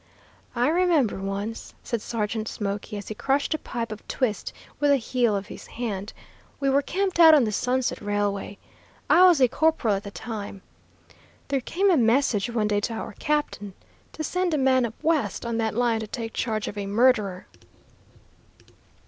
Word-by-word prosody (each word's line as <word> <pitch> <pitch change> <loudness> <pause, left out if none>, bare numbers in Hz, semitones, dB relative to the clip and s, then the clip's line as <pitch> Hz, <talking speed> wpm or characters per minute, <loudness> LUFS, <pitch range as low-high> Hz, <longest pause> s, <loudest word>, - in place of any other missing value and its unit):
"I 245 +1 +2
remember 325 - +2
once," 200 +3 -5
said 235 -3 -3
Sergeant 220 -1 -3
Smoky, 205 0 -4
as 205 - -8
he - - -3
crushed 275 +7 0
a 310 - -2
pipe 230 -4 -5
of 215 - -9
twist 240 -6 -2 0.3
with 290 0 +2
the 280 - +5
heel 240 -3 0
of 200 0 -3
his - - -11
hand, 210 -3 -4 0.5
"we 275 -1 +1
were 280 +1 +3
camped 380 +3 -2
out 320 -2 +9
on 285 - +5
the 215 - 0
'Sunset' 250 +4 -1
railway. 205 -1 -2 0.5
I 360 - +7
was 345 -5 +5
a 255 - +6
corporal 280 -4 +1
at 195 0 -2
the 200 - -7
time. 205 -2 -7 0.9
There 275 -1 0
came 385 +10 +1
a 340 - +4
message 235 -3 +2
one 225 -3 0
day 205 -1 +1
to 215 +3 -3
our 220 - -6
captain, 295 -10 -2 0.4
to 310 - -5
send 360 +1 0
a - - +1
man 260 -2 +3
up 225 - -11
West 315 -6 0
on 235 -1 -2
that 220 -2 -1
line 235 -1 +1
to 220 - -5
take 225 0 -5
charge 215 -3 -2
of 205 - -5
a 200 - -4
murderer. 210 -4 +2
235 Hz, 180 wpm, -25 LUFS, 210-275 Hz, 0.9 s, out